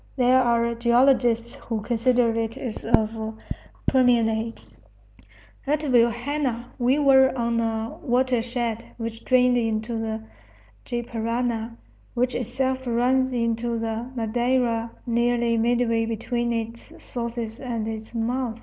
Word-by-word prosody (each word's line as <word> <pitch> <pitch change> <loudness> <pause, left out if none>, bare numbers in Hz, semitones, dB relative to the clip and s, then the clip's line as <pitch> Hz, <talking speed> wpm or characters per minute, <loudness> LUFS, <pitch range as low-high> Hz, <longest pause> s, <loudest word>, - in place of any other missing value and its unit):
There 255 0 +4
are 235 -1 +2
geologists 235 0 +3
who 225 -2 -4
consider 240 +1 +2
it 230 +2 -2
as 245 -5 -6
of 220 0 0 0.5
Permian 245 -4 +4
age. 225 +1 -4 1.0
At 295 +1 +1
Vilhena 245 -1 +1
we 250 +3 +3
were 265 -2 +5
on 235 -1 0
a 225 0 -2
watershed 245 -3 0
which 230 -1 -6
drained 250 -1 +4
into 225 0 -1
the 220 0 -3 0.6
Gy 240 -1 -3
Parana, 230 0 -2 0.4
which 250 +1 +1
itself 260 +2 -2
runs 255 +2 +2
into 230 -1 -1
the 225 +2 -3
Madeira 235 0 0 0.2
nearly 235 0 +1
midway 230 -1 +1
between 235 +1 -2
its 230 0 -4
sources 235 -2 -5
and 235 -4 -3
its 220 +1 -6
mouth. 235 0 -2
235 Hz, 120 wpm, -24 LUFS, 230-250 Hz, 1.0 s, were